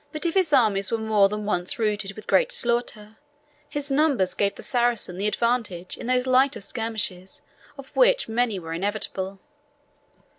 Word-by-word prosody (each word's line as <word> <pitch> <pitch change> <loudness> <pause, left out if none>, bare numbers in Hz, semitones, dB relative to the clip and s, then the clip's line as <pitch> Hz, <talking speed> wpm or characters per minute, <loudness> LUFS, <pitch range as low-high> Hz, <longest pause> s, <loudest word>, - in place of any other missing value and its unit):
But 305 +2 -4
if 335 - +1
his 370 -5 +2
armies 215 -8 +3
were 230 - 0
more 215 -3 +3
than 210 0 -4
once 180 -3 0
routed 210 -3 -1
with 215 +1 -11
great 190 - +3
slaughter, 235 -3 -1 0.5
his 290 -1 -2
numbers 270 - +2
gave 200 -1 0
the - - -9
Saracen 235 -7 0
the 205 - 0
advantage 210 -6 -1
in - - -8
those 250 0 +2
lighter 265 +2 +3
skirmishes, 205 -4 -4 0.3
of 275 -1 -12
which - - +4
many 225 -2 0
were 165 -2 -6
inevitable. 195 +1 -3
220 Hz, 160 wpm, -24 LUFS, 195-250 Hz, 0.5 s, which